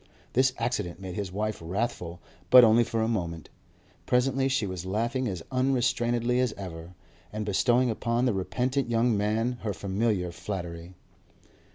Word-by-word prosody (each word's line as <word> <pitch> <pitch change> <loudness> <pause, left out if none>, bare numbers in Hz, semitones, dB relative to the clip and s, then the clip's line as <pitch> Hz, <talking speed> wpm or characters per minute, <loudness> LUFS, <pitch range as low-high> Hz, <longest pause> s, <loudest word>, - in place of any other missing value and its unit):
This 130 +1 +4
accident 105 -7 -2
made 95 -2 -6
his 100 -1 -4
wife 105 +1 -3
wrathful, 90 -2 -3 0.3
but 125 -1 +10
only 115 +1 +6
for 115 -1 -1
a - - +1
moment; 85 -8 -3 0.6
presently 135 +2 +2
she 130 -5 +1
was 95 -3 -5
laughing 115 +7 -1
as 90 -6 -4
unrestrainedly 125 -2 +1
as 125 -4 +1
ever, 90 -2 -8 0.4
and 105 0 -4
bestowing 120 +4 +2
upon 115 +2 0
the 125 - +2
repentant 125 +7 -1
young 115 0 +2
man 110 +4 0
her 105 -2 -2
familiar 100 -1 -1
flattery. 85 -2 -6
110 Hz, 150 wpm, -28 LUFS, 95-125 Hz, 0.6 s, but